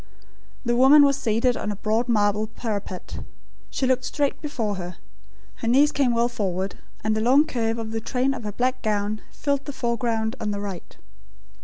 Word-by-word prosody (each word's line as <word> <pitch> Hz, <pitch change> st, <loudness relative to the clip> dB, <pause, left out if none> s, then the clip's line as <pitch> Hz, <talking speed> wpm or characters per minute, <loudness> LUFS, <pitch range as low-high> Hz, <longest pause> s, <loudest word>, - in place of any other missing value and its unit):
The 240 Hz, 0 st, +2 dB
woman 270 Hz, +4 st, +8 dB
was 280 Hz, -1 st, +4 dB
seated 235 Hz, 0 st, +1 dB
on 210 Hz, -, -3 dB
a -, -, -3 dB
broad 220 Hz, +4 st, 0 dB
marble 210 Hz, -1 st, +2 dB
parapet. 210 Hz, -5 st, -5 dB, 0.5 s
She 265 Hz, -, -1 dB
looked 255 Hz, 0 st, +2 dB
straight 285 Hz, +1 st, -1 dB
before 225 Hz, -9 st, -2 dB
her. 175 Hz, -1 st, -6 dB, 0.6 s
Her 230 Hz, -, -4 dB
knees 280 Hz, +5 st, +5 dB
came 255 Hz, -5 st, +2 dB
well 235 Hz, +1 st, +3 dB
forward, 195 Hz, -5 st, -2 dB, 0.3 s
and 215 Hz, 0 st, +1 dB
the 215 Hz, -, 0 dB
long 265 Hz, +6 st, +5 dB
curve 230 Hz, -6 st, -1 dB
of 225 Hz, -1 st, -5 dB
the 225 Hz, 0 st, -2 dB
train 255 Hz, +4 st, 0 dB
of 250 Hz, -, -7 dB
her 210 Hz, -, -3 dB
black 255 Hz, +4 st, -1 dB
gown 210 Hz, 0 st, -1 dB
filled 280 Hz, -1 st, -1 dB
the 285 Hz, -, -4 dB
foreground 235 Hz, -2 st, -1 dB
on 210 Hz, -, -1 dB
the 205 Hz, -1 st, -2 dB
right. 195 Hz, -4 st, -7 dB
230 Hz, 185 wpm, -24 LUFS, 210-255 Hz, 0.6 s, woman